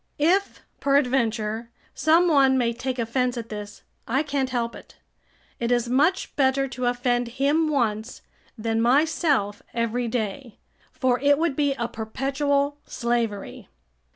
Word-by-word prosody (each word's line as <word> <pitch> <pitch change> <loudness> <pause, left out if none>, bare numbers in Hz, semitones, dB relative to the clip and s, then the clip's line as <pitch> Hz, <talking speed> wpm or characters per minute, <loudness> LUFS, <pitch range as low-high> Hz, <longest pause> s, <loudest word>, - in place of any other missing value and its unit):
If, 365 +7 +1 0.2
peradventure, 235 -5 +1 0.2
some 330 +3 +4
one 270 -4 +4
may 235 -2 +1
take 255 +2 -4
offence 245 +1 0
at 230 -1 -6
this, 210 -1 -8 0.2
I 265 +6 +1
can't 280 -3 -1
help 235 -2 -2
it; - - -14 0.6
it 235 0 -1
is 240 -1 +2
much 300 +9 +1
better 270 0 +2
to 250 0 -3
offend 245 0 0
him 295 +4 +2
once 230 -5 -1 0.3
than 225 0 -1
myself 270 - +2
every 235 +1 -1
day, 225 +1 -4 0.3
for 255 -2 +1
it 285 +1 +4
would 320 -3 0
be 285 -1 +1
a 235 -3 -2
perpetual 280 +5 -1
slavery. 235 - -3
250 Hz, 135 wpm, -24 LUFS, 230-280 Hz, 0.6 s, some